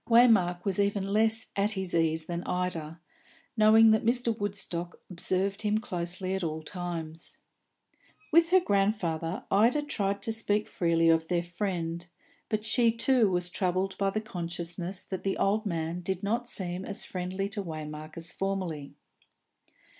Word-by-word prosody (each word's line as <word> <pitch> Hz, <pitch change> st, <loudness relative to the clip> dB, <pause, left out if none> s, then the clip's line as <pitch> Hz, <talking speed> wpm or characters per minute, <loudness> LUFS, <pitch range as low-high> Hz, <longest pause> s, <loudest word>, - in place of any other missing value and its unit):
Waymark 210 Hz, -7 st, +5 dB
was 195 Hz, -1 st, -1 dB
even 200 Hz, -1 st, 0 dB
less 225 Hz, +1 st, +1 dB
at 205 Hz, +2 st, +1 dB
his 190 Hz, -3 st, -3 dB
ease 160 Hz, -1 st, +1 dB
than 170 Hz, 0 st, -3 dB
Ida, 170 Hz, -3 st, -3 dB, 0.6 s
knowing 220 Hz, 0 st, +7 dB
that 220 Hz, -, +3 dB
Mr. 235 Hz, 0 st, +1 dB
Woodstock 185 Hz, -4 st, -3 dB
observed 190 Hz, +3 st, 0 dB
him 210 Hz, 0 st, +1 dB
closely 185 Hz, -3 st, -1 dB
at 190 Hz, -1 st, -2 dB
all 160 Hz, -1 st, -3 dB
times. 165 Hz, -2 st, -6 dB, 0.9 s
With 330 Hz, +1 st, +5 dB
her 375 Hz, +1 st, +6 dB
grandfather 195 Hz, -, 0 dB
Ida 235 Hz, +9 st, +4 dB
tried 200 Hz, -8 st, -2 dB
to 225 Hz, -, 0 dB
speak 215 Hz, -1 st, 0 dB
freely 165 Hz, -1 st, +2 dB
of 165 Hz, 0 st, +3 dB
their 175 Hz, 0 st, 0 dB
friend, 175 Hz, -2 st, -3 dB, 0.4 s
but 215 Hz, -1 st, -1 dB
she 230 Hz, +1 st, +3 dB
too 230 Hz, -1 st, +3 dB
was 180 Hz, -1 st, 0 dB
troubled 185 Hz, +1 st, 0 dB
by 195 Hz, -1 st, +2 dB
the 215 Hz, +2 st, -2 dB
consciousness 175 Hz, -2 st, -4 dB
that 190 Hz, -1 st, -6 dB
the 195 Hz, -, -1 dB
old 210 Hz, +2 st, +1 dB
man 165 Hz, -1 st, -2 dB
did 190 Hz, +1 st, -3 dB
not 235 Hz, +4 st, -1 dB
seem 180 Hz, -1 st, -1 dB
as 200 Hz, -, -5 dB
friendly 185 Hz, +2 st, -3 dB
to 205 Hz, 0 st, -3 dB
Waymark 155 Hz, -2 st, -7 dB
as 165 Hz, +1 st, +1 dB
formerly. 185 Hz, -7 st, -3 dB
190 Hz, 155 wpm, -29 LUFS, 170-215 Hz, 0.9 s, knowing